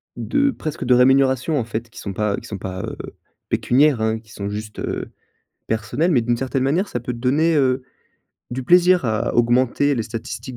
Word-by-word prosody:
de 280 -1 +1
presque 155 - -5
de 125 - +4
rémunération, 130 +3 +3
en 115 - -2
fait, 115 +1 -5
qui - - -12
sont 100 - -5
pas 105 0 -1
qui - - -9
sont 100 - -5
pas, 95 0 -6
heu, - - -5 0.5
pécuniaires, 135 0 +3
hein, 110 0 0
qui 110 0 -20
sont 100 -3 -5
juste 105 +1 -6
heu, - - -4 0.6
personnelles 115 +10 0
mais 130 -7 +3
d'une 120 +1 0
certaine 130 +1 -2
manière, 165 +9 +1
ça 120 - -3
peut 125 +1 -4
te - - -8
donner, 150 +7 +2
heu, 130 -2 +2 0.7
du 130 +2 -4
plaisir 180 +4 +4
à 115 0 -1
augmenter 125 +4 +2
les 115 - -1
statistiques 120 +3 -7
125 Hz, 200 wpm, -21 LUFS, 110-140 Hz, 0.7 s, de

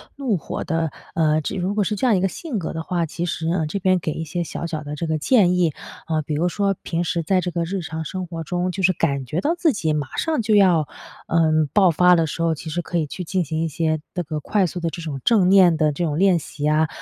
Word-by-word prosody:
怒 255 -9 0
火 - - -5
的， 165 -1 -1 0.2
呃， 155 -1 +2 0.2
如 190 +3 -1
果 210 - +2
是 210 +2 -2
这 255 - +1
样 225 - +4
一 185 - +1
个 190 - +1
性 290 - -5
格 170 - -4
的 165 - -4
话， 170 0 -1
其 170 +2 -4
实， 160 -1 -3
嗯， 165 -3 0
这 175 - -3
边 185 -1 +2
给 155 - -3
一 160 - -4
些 170 +2 -3
小 170 - -5
小 160 -2 -4
的 150 0 -6
这 165 - -3
个 160 -1 0
建 180 - +4
议。 175 -4 +2 0.3
嗯， 160 -2 0
比 150 - -3
如 160 +4 +1
说 200 +2 0
平 170 0 -2
时 170 0 -1
在 185 +3 +2
这 180 - -3
个 170 -1 -1
日 190 +2 -3
常 160 -1 -5
生 185 +3 -4
活 165 -1 -6
中， 180 +2 -1
就 190 +1 -4
是 185 +1 +4
感 140 -5 -1
觉 155 +8 -2
到 315 - +1
自 330 -4 +2
己 160 -7 -1
马 145 -3 -3
上 315 -6 0
就 215 -1 +2
要， 180 -7 +4 0.4
嗯， 155 -2 +2
爆 190 -4 +5
发 180 +3 +5
的 165 -1 +2
时 160 +2 -5
候， 165 -1 +2
其 160 +1 -8
实 175 +3 -2
可 175 - -3
以 160 - +1
去 180 +5 -6
进 185 +2 0
行 160 +1 -3
一 165 - 0
些 155 0 -1
这 180 - -2
个 155 -1 -4
快 195 +6 +1
速 180 +1 -4
地 170 -1 -1
这 170 - -7
种 150 -4 -5
正 200 -6 +4
念 185 -4 +6
的 155 -1 +2
这 170 +4 -2
种 150 -2 -2
练 185 -1 +4
习 150 -1 -9
呀。 155 +1 +3
170 Hz, 300 characters per minute, -22 LUFS, 155-185 Hz, 0.4 s, 念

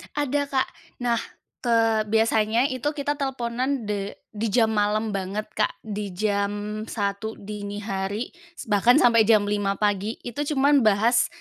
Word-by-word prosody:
Ada 290 0 0
Kak, 265 -2 +1 0.4
nah 235 -1 +2 0.4
ke 225 -3 +2
biasanya 225 +3 +2
itu 260 +2 -3
kita 290 0 -2
teleponan 260 -1 -1
de 200 -1 -3 0.2
di 220 +1 -2
jam 220 +1 +3
malam 215 +1 +1
banget 195 +1 -3
Kak, 215 - 0
di 205 -3 -5
jam 205 +1 -1
1.00 205 +1 -3
dini 205 0 -6
hari, 200 +2 -3 0.4
bahkan 220 +5 +5
sampai 230 -3 +5
jam 215 -2 +5
5.00 205 -1 0
pagi, 205 +1 0
itu 290 +5 -3
cuman 280 +1 +5
bahas 225 +4 +4
220 Hz, 140 wpm, -24 LUFS, 205-245 Hz, 0.4 s, bahkan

